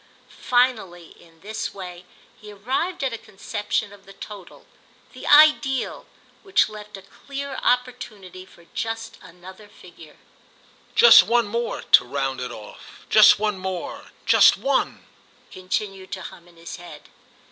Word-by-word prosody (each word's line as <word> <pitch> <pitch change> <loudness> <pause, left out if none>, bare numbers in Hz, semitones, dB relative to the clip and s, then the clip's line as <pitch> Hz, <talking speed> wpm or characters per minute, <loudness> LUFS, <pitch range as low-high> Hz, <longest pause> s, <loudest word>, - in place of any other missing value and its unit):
Finally, 215 -9 0
in 165 -1 -22
this 215 +2 -5
way, 180 -2 -9 0.3
he 210 -1 -13
arrived 265 - -3
at 260 -3 -1
a 230 - -6
conception 205 +1 -4
of 200 -1 -18
the 195 - -13
total, 195 -2 -12 0.5
the - - -9
ideal, 295 -3 +4 0.3
which 390 -2 +2
left 210 -1 -11
a 195 - -14
clear 280 +7 -8
opportunity 240 -7 -3
for 170 -2 -20
just 225 0 -5
another 185 +3 -14
figure. 165 -6 -16 0.8
"Just 475 - +9
one 235 0 +1
more—to 235 +3 +2
round 135 0 -3
it 125 -1 -5
off; 110 -3 -13
just - - +7
one 210 -2 -2
more, 185 -2 -6 0.2
just - - +6
one," 275 0 -1 0.5
continued 190 +1 -5
to 190 -2 -6
hum 170 +1 -12
in 170 -1 -21
his 165 0 -9
head. 175 -4 -13
200 Hz, 135 wpm, -23 LUFS, 180-235 Hz, 0.8 s, Just